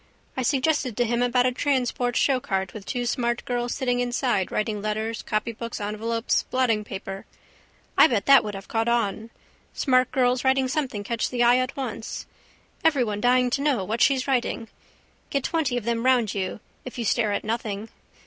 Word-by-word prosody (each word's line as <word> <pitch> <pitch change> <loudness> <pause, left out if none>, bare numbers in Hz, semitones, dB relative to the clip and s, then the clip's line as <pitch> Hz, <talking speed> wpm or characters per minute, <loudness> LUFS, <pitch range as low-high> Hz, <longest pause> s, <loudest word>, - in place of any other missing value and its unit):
I 260 - -1
suggested 265 -2 +1
to 245 - +2
him 235 +1 0
about 245 0 +3
a 255 - +3
transparent 250 -2 0
showcart 195 -10 0
with 210 -2 -9
two 245 -1 -2
smart 240 0 -1
girls 245 -1 -2
sitting 245 -2 0
inside 245 -5 0
writing 215 -1 -1
letters, 215 +2 -2
copybooks, 230 +1 -3
envelopes, 225 +3 -1
blottingpaper. 210 -6 -1 0.7
I - - +8
bet 225 -8 0
that 275 -1 +7
would 210 -1 -5
have 195 0 -8
caught 225 0 -1
on. 225 -2 0 0.5
Smart 255 -2 +2
girls 250 -1 +2
writing 265 0 +3
something 255 -7 -2
catch 230 +2 -1
the 245 -1 +1
eye 240 +1 +6
at 255 +2 -2
once. 235 -5 -5 0.6
Everyone 245 -10 +2
dying 250 0 +3
to 275 - 0
know 280 -8 +1
what 225 +4 -2
she's 265 -2 +3
writing. 240 -3 -1 0.6
Get 275 -2 -1
twenty 290 -7 0
of 240 - -3
them 230 +1 -1
round 250 -5 +3
you 195 +1 -3 0.2
if 255 - -8
you 235 - -2
stare 215 0 +2
at 200 - -1
nothing. 220 -1 -3
240 Hz, 175 wpm, -25 LUFS, 215-255 Hz, 0.7 s, I